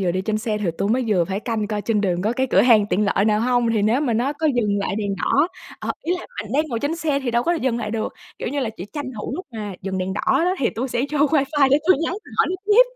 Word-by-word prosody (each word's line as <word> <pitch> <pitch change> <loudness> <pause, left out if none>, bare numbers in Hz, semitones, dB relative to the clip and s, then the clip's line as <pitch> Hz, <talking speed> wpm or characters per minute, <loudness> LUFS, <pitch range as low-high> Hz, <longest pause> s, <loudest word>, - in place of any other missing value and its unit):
vừa 185 -2 +1
đi 185 - -1
trên 215 +2 -1
xe 215 -1 -2
thì 200 -5 0
tui 195 - 0
mới 250 +4 +1
vừa 185 -5 +3
phải 195 +3 -3
canh 220 -3 -2
coi 210 -1 -2
trên 220 -2 +1
đường 180 -3 0
có 215 +3 +1
cái 260 +2 0
cửa 190 - +5
hàng 220 -4 +5
tiện 210 - +2
lợi 200 -1 +2
nào 210 0 +2
hông? 245 0 +2
Thì 215 -2 +1
nếu 225 +6 +2
mà 275 -6 0
nó 250 +6 +1
có 295 +2 -1
dừng 210 -4 +1
lại 195 0 -2
đèn 200 -2 -1
đỏ, 290 - +2 0.3
ờ, - - -2
ý 345 - 0
là - - -10 0.2
bạn 215 +1 -9
đang 300 +3 +2
ngồi 235 -4 -2
trên 300 +3 -1
xe 300 -4 0
thì 260 -3 -2
đâu 235 0 +2
có 340 - +1
dừng 260 -8 0
lại 210 - -3
được. 220 0 -2 0.3
Kiểu, - - -3
như 285 +3 -2
là 240 -4 -1
chỉ 180 - -6
tranh 290 -2 -4
thủ 210 - -4
lúc 370 - -6
mà 210 -3 -5
dừng 190 0 -3
đèn 185 +1 -2
đỏ 205 - -2 0.2
đó 365 +1 +2
thì 245 - +1
tui 255 +4 -3
sẽ 240 - -1
vô 300 - 0
wifi 285 -1 +3
để 280 - +5
tui 370 - +7
nhắn 330 +2 -1 0.3
hỏi - - +5 0.2
tiếp. 425 +4 +7
230 Hz, 305 wpm, -22 LUFS, 210-275 Hz, 0.3 s, tui